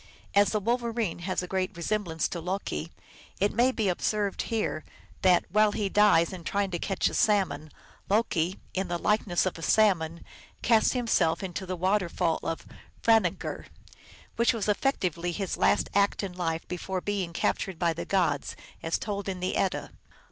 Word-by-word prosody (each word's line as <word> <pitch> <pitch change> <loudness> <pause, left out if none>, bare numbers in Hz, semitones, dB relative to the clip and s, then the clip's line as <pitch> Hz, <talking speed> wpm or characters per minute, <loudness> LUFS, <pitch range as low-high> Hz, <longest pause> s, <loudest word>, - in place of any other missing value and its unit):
As 200 -1 +5
the 215 - 0
Wolverine 230 -4 -1
has 185 +1 -2
a - - -5
great 185 0 -2
resemblance 170 -2 -1
to 170 - -4
Loki, 180 -2 -3 0.5
it 200 +1 +2
may 245 +4 +4
be 225 - -2
here 195 - +3
observed 205 +4 -1 0.7
that, 180 -2 +4
while 215 +1 +4
he 205 -2 -1
dies 195 -5 +4
in 180 -2 -8
trying 200 +2 -1
to 175 - -2
catch 195 +1 0
a - - -3
salmon, 195 -7 +1 0.2
" - - -28
Loki, 190 -4 +1 0.2
in 190 0 -1
the 175 0 -1
likeness 200 -2 +1
of 185 -2 -2
a - - -8
salmon, 170 -5 +2 0.4
cast 225 -2 +4
him 250 -2 -1
self 165 -6 +2
into 190 0 -5
the 185 - -2
waterfall 180 -2 +1
of 165 - -4 0.4
Franangr," 220 -7 +1 0.7
which 235 +2 +4
was 225 -4 -2
effec 215 +7 +1
tively 175 -1 -2
his 195 -3 -2
last - - +2
act 200 0 +2
in 190 -2 -4
life 165 -2 -2
before 185 +1 -3
being 195 -2 -2
captured 185 +2 -1
by 170 -1 +1
the 165 - -5
gods, 175 -8 0 0.3
as 165 - 0
told 200 -2 -4
in 185 -1 -4
the 185 +1 -1
Edda. 190 - -1
190 Hz, 175 wpm, -28 LUFS, 175-210 Hz, 0.7 s, As